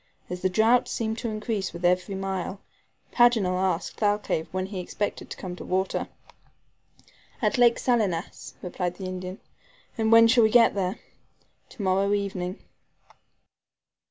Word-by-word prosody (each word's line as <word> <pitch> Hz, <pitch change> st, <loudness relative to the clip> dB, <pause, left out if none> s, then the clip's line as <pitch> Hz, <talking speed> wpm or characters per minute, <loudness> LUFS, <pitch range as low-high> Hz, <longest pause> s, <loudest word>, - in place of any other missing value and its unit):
As 180 Hz, 0 st, -4 dB
the 185 Hz, -, +2 dB
drought 225 Hz, +6 st, +3 dB
seemed 220 Hz, 0 st, -2 dB
to 235 Hz, -, -3 dB
increase 215 Hz, -3 st, -3 dB
with 175 Hz, +1 st, -5 dB
every 180 Hz, +2 st, +1 dB
mile, 190 Hz, 0 st, -3 dB, 0.5 s
Paganel 220 Hz, -7 st, +3 dB
asked 185 Hz, -2 st, -1 dB
Thalcave 205 Hz, -6 st, 0 dB
when 185 Hz, 0 st, -2 dB
he 195 Hz, -1 st, -6 dB
expected 205 Hz, +3 st, -4 dB
to -, -, -7 dB
come 180 Hz, -2 st, -6 dB
to -, -, -8 dB
water. 190 Hz, +1 st, -1 dB, 1.3 s
"At 270 Hz, -, 0 dB
Lake 240 Hz, -1 st, +5 dB
Salinas," 205 Hz, -9 st, -1 dB
replied 180 Hz, -1 st, -3 dB
the 190 Hz, -, -7 dB
Indian. 185 Hz, 0 st, -6 dB, 0.6 s
"And 220 Hz, 0 st, +2 dB
when 230 Hz, 0 st, +8 dB
shall 235 Hz, 0 st, +5 dB
we 220 Hz, -, +5 dB
get 230 Hz, 0 st, +5 dB
there?" 195 Hz, +2 st, -2 dB, 0.7 s
"To 220 Hz, -, -8 dB
morrow 195 Hz, +2 st, +2 dB
evening." 190 Hz, -1 st, -3 dB
195 Hz, 145 wpm, -26 LUFS, 185-220 Hz, 1.3 s, when